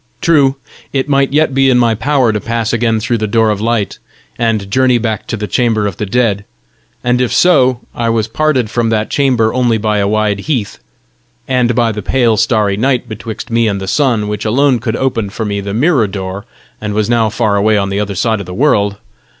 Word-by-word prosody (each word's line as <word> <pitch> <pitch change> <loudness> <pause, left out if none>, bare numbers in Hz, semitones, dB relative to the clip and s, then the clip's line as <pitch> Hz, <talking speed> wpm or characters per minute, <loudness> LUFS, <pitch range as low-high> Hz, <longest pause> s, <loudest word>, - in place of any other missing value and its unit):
True, 140 -5 +3 0.4
it 135 0 -1
might 140 -1 +2
yet 150 -1 +2
be 135 0 +3
in 125 - +4
my 120 -2 +3
power 130 +1 +1
to 105 - -2
pass 115 -1 -2
again 115 -1 +1
through 115 +2 -1
the 110 - -1
door 110 +1 +2
of 105 -1 -3
light, 115 -3 -1 0.4
and 110 -4 -1
journey 130 0 +3
back 110 -3 -3
to 115 - -3
the 105 - -3
chamber 110 -2 0
of 100 -3 -3
the 105 - -3
dead; 105 -2 0 0.6
and 125 0 +1
if 125 - 0
so, 130 -8 +3
I 115 -1 -1
was 115 -1 0
parted 130 -2 0
from 120 -2 0
that 110 -1 -1
chamber 125 -6 +1
only 120 -3 +1
by 105 -1 0
a 100 - +1
wide 105 -1 0
heath, 120 -3 -3 0.7
and 125 -2 +1
by 115 -1 +2
the 105 -1 -5
pale, 120 +1 +1
starry 110 -3 +1
night 125 +1 0
betwixt 110 +1 -7
me 115 0 +2
and 100 -2 -1
the 95 - -6
sun, 115 -2 +1
which 105 0 -4
alone 130 +3 +2
could 115 -1 -3
open 120 -6 -1
for 110 +3 -5
me 100 -1 -2
the 100 0 -5
mirror 125 - +2
door, 95 0 -6 0.4
and 105 -1 -3
was 105 -1 +1
now 115 -2 +2
far 110 -2 0
away 105 +1 +2
on 100 -1 -1
the 100 +1 -2
other 100 -1 -3
side 110 +3 0
of 100 - -7
the 90 - -7
world! 105 -6 +2
115 Hz, 220 wpm, -14 LUFS, 105-125 Hz, 0.7 s, in